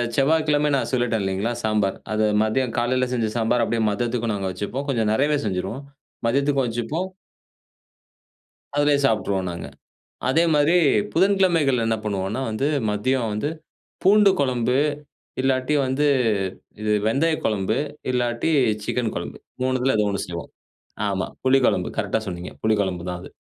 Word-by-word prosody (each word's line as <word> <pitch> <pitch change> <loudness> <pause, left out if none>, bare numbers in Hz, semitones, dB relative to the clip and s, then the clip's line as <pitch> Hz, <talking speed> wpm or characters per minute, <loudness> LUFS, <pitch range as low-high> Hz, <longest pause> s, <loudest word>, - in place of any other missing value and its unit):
செவ்வாய்க்கிழமை 150 +1 +2
நான் 135 - -1
சொல்லிட்டேன் 120 -4 +1
இல்லிங்களா, 95 +4 -1
சாம்பார். 105 -3 +1
அத 110 0 +1 0.2
மதியம் 115 +3 0
காலையில 125 +2 +1
செஞ்ச 115 -3 0
சாம்பார் 115 +1 +2
அப்டியே 115 0 -1
மதியத்துக்கும் 115 +1 -1
நாங்க 100 -1 -3
வச்சுப்போம். 105 +9 -4
கொஞ்சம் 115 -5 +1
நெறையவே 145 +6 +2
செஞ்சுருவோம், 95 +7 -3 0.4
மதியத்துக்கும் 140 +2 +2
வச்சுப்போம். 120 +11 -3 1.7
அதுலேயே 145 -1 +3
சாப்பட்டுருவோம் 100 -6 0
நாங்க. 85 - -6 0.6
அதே 160 +6 +3
மாரி 150 +4 +4 0.4
புதன்கிழமைகள் 170 - +3
என்ன 115 0 +1
பண்ணுவோம்னா 100 +2 -2
வந்து, 110 +6 -1 0.2
மதியம் 115 +3 0
வந்து 105 +8 -1 0.6
பூண்டு 205 +1 +6
குழம்பு 125 -2 +1 0.6
இல்லாட்டி 130 +2 +1
வந்து 130 +3 0 0.8
இது 105 0 0 0.2
வெந்தய 155 +8 +2
குழம்பு 105 +1 0 0.3
இல்லாட்டி 120 +2 0 0.3
சிக்கன் 115 +1 -1
குழம்பு. - - -5 0.2
3த்துல 130 0 +1
ஏதோ 105 - +2
ஒண்ணு 100 - -2
செய்வோம். 85 -1 -7 0.6
ஆமா, 95 -2 -1 0.2
புளி 130 +1 +4
குழம்பு 90 - +1
கரெக்ட்டா 110 0 0
சொன்னீங்க, 90 -1 -6
புளி 110 0 +3
குழம்பு 90 -3 -3
தான் 90 0 -4
அது. - - -10
120 Hz, 135 wpm, -23 LUFS, 105-135 Hz, 1.7 s, பூண்டு